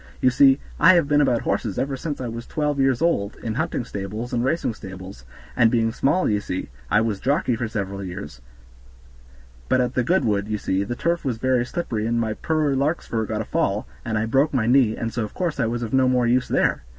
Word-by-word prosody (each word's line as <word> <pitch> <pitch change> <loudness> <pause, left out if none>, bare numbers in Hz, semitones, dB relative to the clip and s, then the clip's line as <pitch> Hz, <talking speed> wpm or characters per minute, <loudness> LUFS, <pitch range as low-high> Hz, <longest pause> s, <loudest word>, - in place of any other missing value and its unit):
You 130 - +3
see, 135 +2 +5 0.2
I 175 +4 +7
have 170 -5 +3
been 145 0 +3
about 125 -5 +2
horses 105 -6 -1
ever 135 0 -1
since 145 +2 -5
I 125 - -3
was 115 +1 -6
twelve 150 -2 -1
years 135 +1 +2
old, 105 -12 +1
in 110 - -2
hunting 120 - -2
stables, 105 +5 -5
and 120 -1 +1
racing 135 -2 0
stables; 95 - -10 0.3
and 115 - +5
being 115 -1 +1
small, 140 +10 +1
ye 105 -1 +1
see, 90 -2 -5 0.2
I 105 - +4
was 110 -3 -1
jockey 135 -1 +1
for 115 0 -3
several 100 -2 -4
years; 80 -9 -7 1.3
but 130 - +3
at 125 0 0
the 125 - +1
Goodwood, 105 - +1
ye 110 0 -1
see, 95 -1 -1
the 120 +4 -4
turf 170 +6 -1
was 130 -6 -2
very 125 0 +1
slippery 115 -11 -3
and 115 0 0
my 110 -2 -1
poor 155 +3 0
Larkspur 135 -6 -1
got 110 -1 -2
a - - -5
fall, 105 -11 -1 0.2
and 110 -2 -2
I 110 - 0
broke 135 +6 +2
my 120 -4 +2
knee, 120 -2 +3
and 115 -1 -3
so 120 - -1
of 105 - -7
course 170 -5 -2
I 115 - +2
was 120 +1 -2
of 115 - -5
no 130 -1 +4
more 125 -1 +2
use 125 +2 +2
there. - - +1
120 Hz, 230 wpm, -23 LUFS, 110-135 Hz, 1.3 s, I